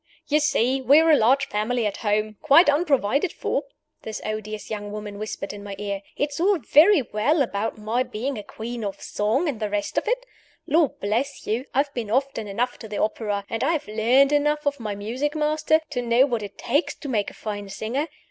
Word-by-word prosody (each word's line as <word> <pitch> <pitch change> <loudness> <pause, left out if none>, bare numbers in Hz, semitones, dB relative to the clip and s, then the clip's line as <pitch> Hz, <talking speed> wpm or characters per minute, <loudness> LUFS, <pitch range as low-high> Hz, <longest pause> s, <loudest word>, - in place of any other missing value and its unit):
"You 300 +1 +3
see 265 -3 +1
we 275 +4 +6
are 325 0 +4
a - - +8
large 265 +2 +3
family 220 +3 -1
at 205 - -2
home, 215 0 -1
quite 305 +1 +6
unprovided 285 - +1
for!" 280 - -2 0.4
this 220 -1 -6
odious 215 0 -5
young 205 -1 -4
woman 210 -1 -6
whispered 215 -2 -5
in 205 -1 -9
my 200 -1 -6
ear. 200 -1 -3 0.2
"It's 290 0 -2
all 390 +3 +3
very 310 - +5
well 275 +8 +1
about 220 -2 -3
my 220 +4 -1
being 255 +2 -3
a 210 - -5
'Queen 230 +3 -6
of 200 -2 -4
Song' 220 +11 0
and 265 -7 -2
the 215 -2 -2
rest 205 0 -1
of - - -13
it. - - 0 0.4
Lord 310 -1 +2
bless 235 +8 -2
you, 230 +5 -1
I 275 - +5
have 285 0 -6
been 235 -5 -4
often 260 -2 0
enough 235 +5 -2
to 225 - -8
the 210 -1 -5
opera, 210 -2 -1
and 225 - -3
I 330 - +2
have 310 - -3
learned 240 +6 +3
enough 295 +1 +1
of 285 -1 0
my 210 -3 -4
music 250 +9 -3
master, 310 +1 +2
to 245 -4 -1
know 240 +2 +4
what 240 -5 -2
it 205 -1 -8
takes 285 +8 0
to 290 - -9
make 215 -6 0
a - - -15
fine 205 -2 -5
singer. 240 +10 -2
240 Hz, 215 wpm, -24 LUFS, 210-285 Hz, 0.4 s, a